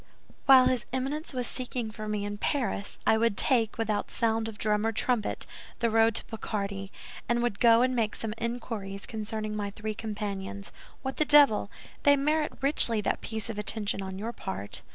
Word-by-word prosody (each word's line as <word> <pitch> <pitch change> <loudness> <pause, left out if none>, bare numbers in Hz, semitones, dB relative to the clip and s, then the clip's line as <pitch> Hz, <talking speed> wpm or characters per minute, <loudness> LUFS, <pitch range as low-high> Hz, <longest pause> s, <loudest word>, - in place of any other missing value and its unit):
"While 260 -2 +9
his 250 -2 +1
Eminence 270 +5 -2
was 250 -2 -2
seeking 245 -2 -3
for 215 0 -7
me 210 -1 -2
in 205 0 -5
Paris, 235 -7 -1
I 220 - +4
would 230 -3 +1
take, 230 -2 +4
without 220 -2 -1
sound 225 -1 0
of 220 -2 -7
drum 210 -1 +1
or 225 - +1
trumpet, 225 0 0 0.3
the 230 -1 +1
road 225 0 +4
to - - 0
Picardy, 200 -3 -4 0.4
and 235 0 +2
would 235 -4 -1
go 230 0 +6
and 255 0 +1
make 220 -3 0
some 220 -2 -4
inquiries 225 -4 -4
concerning 215 -1 -4
my 205 -1 -2
three 215 +2 -5
companions. 205 -2 -5 0.3
What 265 0 -4
the - - +4
devil! 285 -9 +6 0.3
They 285 0 +6
merit 300 +2 +1
richly 270 -5 +3
that - - -1
piece 220 0 -4
of 225 -2 -5
attention 210 -1 -1
on 190 -1 -5
your 225 +4 -4
part." 95 - -5
225 Hz, 185 wpm, -28 LUFS, 210-245 Hz, 0.4 s, While